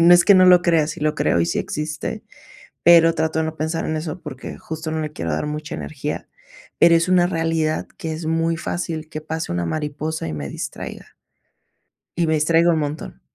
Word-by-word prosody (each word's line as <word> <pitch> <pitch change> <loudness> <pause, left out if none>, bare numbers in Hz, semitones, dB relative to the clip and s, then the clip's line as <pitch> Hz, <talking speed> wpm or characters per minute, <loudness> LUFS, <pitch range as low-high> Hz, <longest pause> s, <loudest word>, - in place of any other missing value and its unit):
no 170 +1 +8
es 175 - +5
que 200 - +7
no 185 -1 +7
lo 180 -1 +7
crea, 165 -3 +3
sí 155 - -6
lo 155 0 +1
creo 85 - +1
y 85 - +2
sí 85 - -1
existe, 150 0 -4 0.6
pero 165 -1 +7
trato 160 0 0
de - - +1
no 160 0 -5
pensar 160 +1 -2
en 155 - -2
eso, 160 +3 -5
porque 130 0 -8
justo 160 0 -6
no 160 0 -2
le 150 -1 -5
quiero 85 - -4
dar 75 - -1
mucha 150 0 -5
energía. 75 0 -5 0.5
Pero 170 0 +6
es 165 +1 +2
una 180 -1 +5
realidad 165 -3 -1
que 160 -1 -4
es 160 +1 -6
muy 165 +1 0
fácil 165 -2 -4
que 155 - -5
pase 160 - -4
una 85 0 -1
mariposa 150 - -3
y 80 - -4
me 70 -2 -5
distraiga, - - -7 1.0
y 170 -1 +1
me 160 - +2
distraigo 165 +3 +3
un 160 - +1
montón. 150 +1 -5
160 Hz, 210 wpm, -21 LUFS, 150-165 Hz, 1.0 s, no